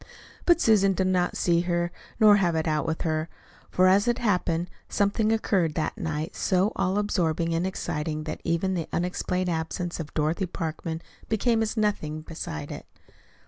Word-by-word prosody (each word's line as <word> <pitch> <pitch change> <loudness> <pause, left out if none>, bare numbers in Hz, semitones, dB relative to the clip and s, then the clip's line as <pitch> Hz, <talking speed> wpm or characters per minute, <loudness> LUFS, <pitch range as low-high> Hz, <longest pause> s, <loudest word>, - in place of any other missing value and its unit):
But 345 -1 +6
Susan 200 - +4
did 190 0 0
not 180 -1 +1
see 170 -1 +3
her 175 0 0 0.3
nor 210 -2 +7
have 175 -4 +1
it 160 +1 0
out 155 0 0
with 160 0 -2
her; 155 0 -1 0.4
for, 185 - +3
as 195 +4 +5
it 240 0 +2
happened, 180 -6 0 0.2
something 205 +2 +1
occurred 190 -8 +1
that 160 - -1
night 160 -6 -3
so 190 +3 +2
all 190 +2 0
absorbing 170 -5 0
and 170 +3 0
exciting 155 -4 -3
that 155 - -5
even 170 +3 0
the 170 -3 -3
unexplained 180 +1 -1
absence 170 +2 -3
of 155 -2 -5
Dorothy 160 +5 0
Parkman 160 0 -4 0.3
became 225 +1 +2
as 220 +1 -1
nothing 155 -8 0
beside 155 - -6
it. - - -8
175 Hz, 170 wpm, -26 LUFS, 160-200 Hz, 0.4 s, nor